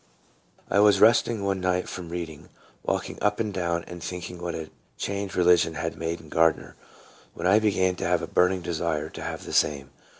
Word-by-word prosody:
I 100 - +2
WAS 105 0 +6
resting 115 -1 +4
one 100 -1 0
night 90 0 0
from 90 -2 -7
reading, 85 -3 -6 0.3
walking - - -3
up - - +1
and 105 -3 -1
down 85 -2 -1
and 90 -1 -9
thinking 90 0 -6
what 85 -1 -3
a 80 -1 -6 0.3
change 100 -1 -3
religion 90 -2 +4
had 80 0 -3
made 80 +1 -3
in 80 - -14
Gardner, 80 +1 +1 0.6
when 85 - -5
I 100 +4 +5
began 95 -4 +2
to - - -3
have - - +1
a - - -3
burning 90 0 +2
desire 80 -3 -2
to - - -9
have - - -5
the - - -7
same. 70 -2 +1
90 Hz, 195 wpm, -26 LUFS, 85-95 Hz, 0.6 s, WAS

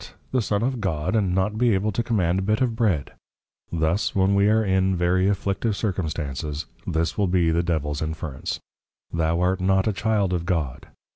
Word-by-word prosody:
the 130 - +2
Son 105 0 0
of 130 -2 -1
God, 90 0 -1
and 95 -5 +1
not 105 +3 0
be 120 -4 +4
able 105 +3 0
to 105 - -1
Command 95 -6 +1
a - - -1
Bit 105 +3 +1
of 125 -3 +1
Bread!_ 100 - +1 0.6
Thus, 85 +4 0
when 95 0 +3
we 100 +1 +4
are 110 0 +3
in 95 0 +2
very 90 +2 +2
Afflictive 100 +1 0
Circumstances, 75 - -3 0.2
this 80 +5 -1
will 100 - +3
be 90 -2 +2
the 85 +1 +2
Devils 75 -4 -1
Inference, 80 -3 -4 0.5
_Thou 85 0 +1
art 90 +1 +1
not 95 +1 +2
a 110 - +2
Child 105 -2 +1
of 85 -1 -2
God. 80 -8 -2
95 Hz, 190 wpm, -24 LUFS, 85-105 Hz, 0.6 s, be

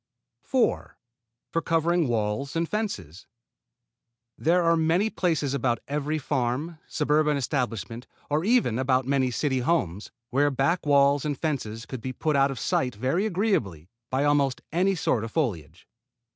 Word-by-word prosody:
4. 260 -3 0 0.5
For 165 - 0
covering 165 0 +1
walls 115 +4 -1
and 165 0 0
fences. 100 - -4 1.1
There 175 +3 +2
are 165 0 +4
many 165 +7 +2
places 160 -6 0
about 125 -3 +1
every 150 +2 -1
farm, 145 +3 -2
suburban 150 0 +1
establishment, 120 - -3 0.2
or 150 +2 0
even 210 - +2
about 130 -1 +2
many 135 -1 +1
city 130 +1 0
homes, 115 - -1 0.2
where 145 +3 +3
back 145 +5 0
walls 140 -1 +4
and 145 -2 -2
fences 115 -8 -3
could 130 +1 -7
be 130 +2 -4
put 155 +3 -1
out 140 0 +4
of 135 - -5
sight 125 +1 0
very 135 - 0
agreeably 145 - -1 0.2
by 130 +2 0
almost 145 -3 +1
any 185 +4 +2
sort 125 -9 0
of 115 - -5
foliage. 90 - -3
140 Hz, 145 wpm, -26 LUFS, 125-165 Hz, 1.1 s, are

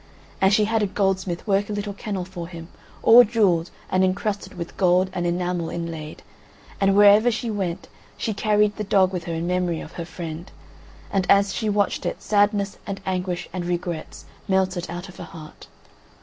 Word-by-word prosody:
And 190 0 +5
she 210 +1 +4
had 225 +1 +1
a 205 - +2
goldsmith 190 -3 -1
work 200 -1 +1
a - - -2
little 205 0 -3
kennel 195 -2 -4
for 175 -2 -7
him, 165 -1 -10 0.3
all 240 +2 +9
jewelled, 200 -7 +2 0.2
and 185 0 +3
incrusted 200 +2 -1
with 170 -1 -7
gold 185 0 +3
and 175 -2 -1
enamel 175 -1 -1
inlaid; 165 -2 -6 0.6
and 195 0 +3
wherever 205 +3 +7
she 235 0 -2
went 190 -4 -3 0.3
she 220 - -2
carried 210 0 +2
the 215 - -2
dog 190 -2 +3
with 175 -2 -4
her 170 - -3
in 165 +1 -2
memory 180 -2 0
of - - -9
her 170 - -6
friend, 165 0 -7 0.6
and 195 -2 0
as 200 -1 +4
she 220 - -1
watched 205 -1 0
it - - -3
sadness 205 -1 +1
and 200 -1 -4
anguish 180 -1 -2
and 180 -2 -3
regrets 175 -2 -4 0.2
melted 190 -2 0
out 175 +2 -6
of 185 - -13
her - - -7
heart. 155 -4 -12
190 Hz, 185 wpm, -23 LUFS, 175-205 Hz, 0.6 s, all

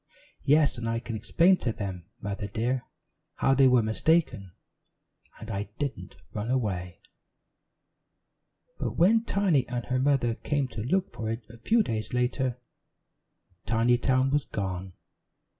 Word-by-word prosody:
"Yes, 145 -3 +4
and 115 -1 -2
I 115 0 0
can 115 -1 -6
explain 170 - +3
to 120 - -1
them, 95 -5 -5 0.2
Mother 100 0 -4
dear, 120 +5 -1 0.5
how 135 - +2
they 135 0 +6
were 125 -2 +5
mistaken, 110 - +1 0.9
and 110 0 -7
I 100 0 -3
didn't 130 -10 -4 0.2
run 105 +2 -3
away." 95 -8 -2 1.8
But - - -3
when 220 +7 +4
Tiny 185 -10 +2
and 120 -1 -3
her 130 0 0
mother 130 -3 +2
came 140 +3 -1
to 115 - -6
look 185 - 0
for 110 -1 -4
it 115 +2 -3
a 115 - -13
few 225 - +3
days 110 - -3
later, 125 0 0 1.1
Tinytown 120 +3 +2
was 145 0 +1
gone. 95 -2 -4
120 Hz, 140 wpm, -28 LUFS, 110-140 Hz, 1.8 s, they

